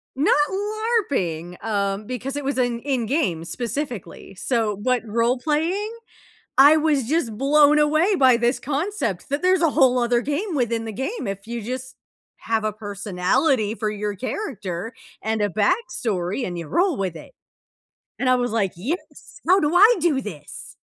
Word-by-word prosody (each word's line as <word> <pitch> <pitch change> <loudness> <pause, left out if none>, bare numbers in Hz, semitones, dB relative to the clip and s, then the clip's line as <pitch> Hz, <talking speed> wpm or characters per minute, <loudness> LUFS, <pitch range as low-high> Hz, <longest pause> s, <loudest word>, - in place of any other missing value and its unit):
Not 280 +4 +3
LARPing, 385 - -2
um, 200 -1 -1
because 255 +3 -5
it 290 - -3
was 275 -1 -1
an 240 -2 0
in-game 250 - -1
specifically. 235 - -5
So 225 0 0
what 245 +5 0
role 235 +3 +1
playing 335 - -1 0.7
I 290 +4 +8
was 295 -5 +1
just 250 -8 -1
blown 295 +2 +5
away 310 +7 +3
by 260 -7 +5
this 240 +2 +1
concept 295 - -2
that 285 +3 -1
there's 370 -1 +3
a 330 - +4
whole 260 -4 +4
other 240 0 +2
game 305 +7 -2
within 230 -3 0
the 220 - -4
game 270 - -4
if 195 +2 -5
you 235 -1 -4
just 255 +3 -6 0.4
have 225 -1 -1
a 215 -1 -1
personality 205 - 0
for 215 -2 -2
your 210 -1 -3
character 215 - -5 0.3
and 220 0 -1
a 205 - +1
backstory 215 - -1
and 175 - -5
you 165 -3 -6
roll 355 - +1
with 185 -4 -2
it. - - -11 0.9
And 255 - +1
I 255 - +5
was, 245 -2 -1
like, 205 -4 0
"Yes! 280 - -6
How 375 +2 +6
do 300 +1 0
I 425 +7 +7
do 300 -5 +1
this?" 155 - -9
250 Hz, 165 wpm, -23 LUFS, 210-300 Hz, 0.9 s, I